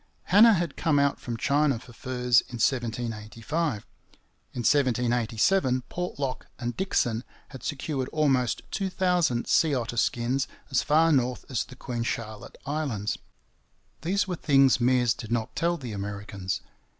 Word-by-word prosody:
Hanna 215 +3 +7
had 170 -4 -2
come 155 -3 +2
out 140 0 +2
from 120 -2 -5
China 140 +1 +2
for 120 +1 -13
furs 125 -1 +2
in 125 - -7
1785. 115 +3 -2 0.7
In 125 - -4
1787 125 - +2
Portlock 145 -7 -4
and 120 -1 -4
Dixon 120 -11 0 0.3
had 130 - -10
secured 140 -2 -3
almost 135 -6 +1
two 195 -2 -1
thousand 180 -10 +1
sea 155 -3 +3
otter 120 -1 -3
skins 120 +4 +1 0.2
as 135 - +3
far 160 +2 +4
north 125 -3 +1
as 125 - 0
the 130 - -13
Queen 120 -2 -4
Charlotte 110 -2 -4
Islands. 135 -9 -2 0.8
These 195 +5 0
were 180 - -2
things 135 -4 +4
Meares 125 -1 +3
did 115 -1 -8
not 115 -2 -1
tell 170 +1 +1
the 125 -7 -7
Americans. 100 -2 -4
130 Hz, 140 wpm, -27 LUFS, 120-150 Hz, 0.8 s, Hanna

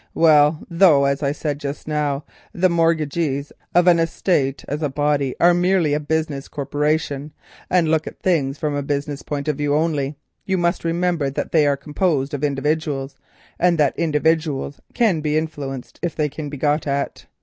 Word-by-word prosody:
"Well, 150 -1 +4
though 165 -5 +5
as 140 +1 0
I 140 -1 +1
said 145 -1 -3
just 145 0 -6
now, 150 -2 -1 0.3
the 185 +1 +2
mortgagees 155 -3 0 0.2
of 175 0 +5
an 175 -2 +5
estate 160 -4 0
as 150 +2 -3
a 150 - 0
body 145 -1 0
are 175 +1 +6
merely 175 -3 +2
a 150 - +1
business 150 -2 -2
corporation, 145 0 -2 0.4
and 180 -3 +3
look 160 0 +1
at - - -8
things 150 -7 0
from 150 -1 -2
a 145 - -1
business 140 0 -3
point 145 0 -4
of 150 -3 0
view 145 0 +1
only, 150 -3 0 0.3
you 190 -1 0
must 175 0 0
remember 170 -3 0
that 135 - -4
they 155 -3 +4
are 140 -1 +2
composed 150 -1 -1
of 145 0 -3
individuals, 145 -1 -1 0.4
and 175 -1 +3
that 145 -3 +3
individuals 155 -3 0
can 210 -10 +2
be 150 0 0
influenced 135 -6 -5
if 175 -3 -2
they 150 -1 0
can 150 +1 -6
be 145 - -6
got 150 +2 0
at. 140 0 -3
150 Hz, 180 wpm, -21 LUFS, 140-165 Hz, 0.4 s, are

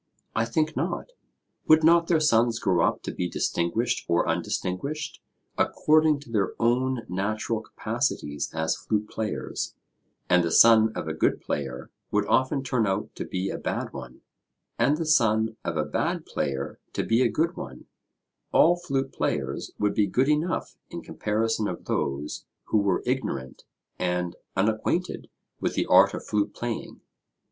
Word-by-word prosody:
I 115 - +2
think 155 +7 0
not. - - -2 0.6
Would 155 0 +6
not 170 +1 +5
their 165 -3 +3
sons 120 -6 +3
grow 95 -5 +2
up - - 0
to - - -3
be 90 -1 -3
distinguished 115 +12 0
or 85 - +2
undistinguished 140 +12 -2 0.4
according 155 -1 +3
to 125 - -13
their 105 -4 0
own 125 +1 +1
natural 110 +4 -2
capacities 110 - -2
as 80 0 0
flute 105 -1 -2
players, 110 -1 -4 0.5
and 90 0 +4
the 85 - 0
son 110 +4 +7
of - - -4
a 80 - -2
good 80 - +1
player 65 -3 -4 0.2
would 105 0 +1
often 130 +5 +2
turn 125 -4 +1
out 95 +2 -2
to - - -5
be 95 0 -2
a - - -5
bad - - -3
one, - - -9 0.6
and 135 +6 +3
the 165 - -2
son 110 -7 +3
of 85 - -2
a 75 - +1
bad - - -1
player 70 0 -3
to - - -1
be 115 +2 +2
a - - +4
good 165 +2 0
one, 65 -1 -8 0.7
all 175 +2 +6
flute 135 -6 -2
players 70 -1 -2
would 105 -1 +1
be 105 -2 +2
good 125 +8 +2
enough 155 +4 0
in - - -7
comparison 110 0 -1
of - - -6
those 70 +2 -2 0.2
who 110 - +3
were 100 -3 +1
ignorant 120 - -3 0.3
and 90 -1 -1 0.2
unacquainted 110 - 0 0.3
with - - -1
the - - +1
art - - +6
of - - -7
flute 105 -1 -1
playing? 120 -1 -5
110 Hz, 160 wpm, -26 LUFS, 90-135 Hz, 0.7 s, son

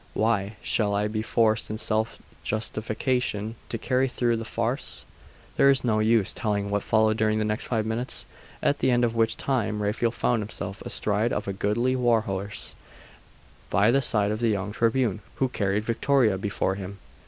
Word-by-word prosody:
Why, 110 -2 +2
I 100 +3 -8
shall 105 -1 +1
be 110 0 -2
forced, 110 -1 +1
in 110 - -3
self 110 0 0 0.3
justification, 110 0 -1 0.2
to 115 - -2
carry 130 +3 +1
through 120 -2 0
the 115 - -5
farce!' 115 +4 -3 0.5
There 140 - +6
is 135 -2 +3
no 110 -3 +2
use 110 -2 +2
telling 100 -2 -1
what 105 0 +1
followed 110 +1 +2
during 110 -1 +2
the 110 - 0
next 105 0 -1
five 110 -3 0
minutes, 115 +3 -3 0.4
at 145 - +2
the - - +2
end 120 -1 +3
of 115 -1 -2
which 115 -1 +2
time 115 -6 -1
Raphael 105 +3 +1
found 120 0 0
himself 100 -1 -6
astride 105 +3 0
of - - -2
a 100 - -1
goodly 115 +6 0
war 120 -3 +3
horse, 100 0 -4 1.0
by 100 +5 +4
the 135 +2 +3
side 105 -5 +2
of 110 - -2
the 115 -1 +2
young 100 -1 -1
Tribune, 115 -2 +1
who 130 - +1
carried 100 -2 0
Victoria 115 -1 +2
before 95 0 -1
him. 100 0 -7
110 Hz, 180 wpm, -26 LUFS, 105-120 Hz, 1.0 s, There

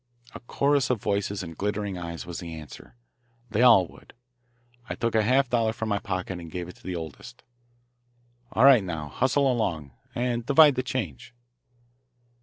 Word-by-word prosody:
A - - -8
chorus 140 +2 +1
of 125 -3 +1
voices 100 -1 -2
and 85 -2 -8
glittering 105 0 -2
eyes 85 -2 -6
was 85 0 -6
the 85 -2 -7
answer. 75 -5 -12 0.6
They 110 +2 +1
all 115 -7 +7
would. - - -18 0.7
I - - -3
took 115 -1 -1
a 110 - +4
half 130 +5 +3
dollar 115 -2 +1
from 110 -1 -4
my 100 -1 0
pocket 95 -3 -4
and 85 -1 -9
gave 90 +1 -5
it 90 - -11
to - - -23
the 90 - -4
oldest. 80 -3 -9 1.1
"All 120 - +4
right 130 -6 +7
now, 80 -5 -5
hustle 130 - +2
along, 85 - -2 0.2
and 120 -1 -1
divide 145 +3 +6
the 130 - -1
change." 120 - -5
105 Hz, 175 wpm, -26 LUFS, 85-125 Hz, 1.1 s, all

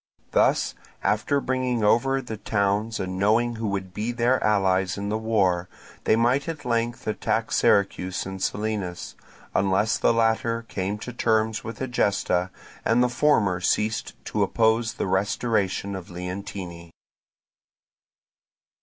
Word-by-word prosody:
Thus, - - +2 0.3
after 110 +7 +1
bringing 130 -3 -1
over 135 +5 +3
the 110 -3 -6
towns 105 +2 0
and 95 0 -3
knowing 115 +4 +2
who 110 -1 -2
would 95 -2 -3
be 110 +5 -2
their 120 +2 +1
allies 95 -3 +2
in 100 0 -3
the 110 - 0
war, 95 -6 +1 0.4
they - - +4
might 125 +6 +2
at 155 -3 -6
length 120 0 -1
attack 110 - -1
Syracuse 95 -2 +2
and 95 0 -6
Selinus; 105 -5 -3 0.4
unless 100 +3 +2
the - - +4
latter 115 0 +1
came 100 -2 -3
to 125 +3 -7
terms 110 -2 +1
with 115 +4 -6
Egesta 100 -7 0 0.3
and 120 +2 +3
the 125 - +2
former 115 -9 +2
ceased 110 +5 0
to - - -2
oppose 110 0 +2
the - - -2
restoration 100 0 0
of 95 -2 -8
Leontini. 90 -1 -6
110 Hz, 135 wpm, -25 LUFS, 95-115 Hz, 0.4 s, they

